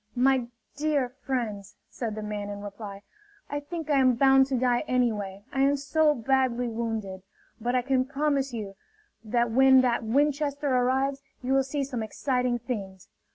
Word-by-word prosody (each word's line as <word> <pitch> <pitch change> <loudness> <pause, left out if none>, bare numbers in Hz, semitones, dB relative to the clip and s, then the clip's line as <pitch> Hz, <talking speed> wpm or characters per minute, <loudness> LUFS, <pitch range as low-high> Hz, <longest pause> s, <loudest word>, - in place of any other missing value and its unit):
"My 255 -1 +3 0.3
dear 290 -3 0
friends," 240 -7 -4 0.2
said 225 -4 -4
the 215 - -5
man 210 -1 -4
in 205 0 -6
reply, 200 -1 -8 0.5
"I 290 - -1
think 320 +2 -6
I 280 - +4
am 255 -2 +4
bound 270 +1 +5
to 265 -2 0
die 245 -1 +2
anyway, 210 -6 -1
I 270 - +1
am 280 +1 +3
so 300 +2 +2
badly 250 0 +1
wounded. 220 -4 -4 0.4
But 240 +3 -1
I 250 - +2
can 260 0 +1
promise 280 -1 0
you 210 -4 -5 0.5
that 235 +1 0
when 265 +2 +6
that 240 -2 +1
Winchester 285 +2 +1
arrives, 265 +2 +1 0.2
you 260 +2 0
will 270 - +4
see 275 +1 -2
some 260 -4 -4
exciting 250 +2 -1
things. 200 -6 -6
255 Hz, 165 wpm, -27 LUFS, 225-270 Hz, 0.5 s, when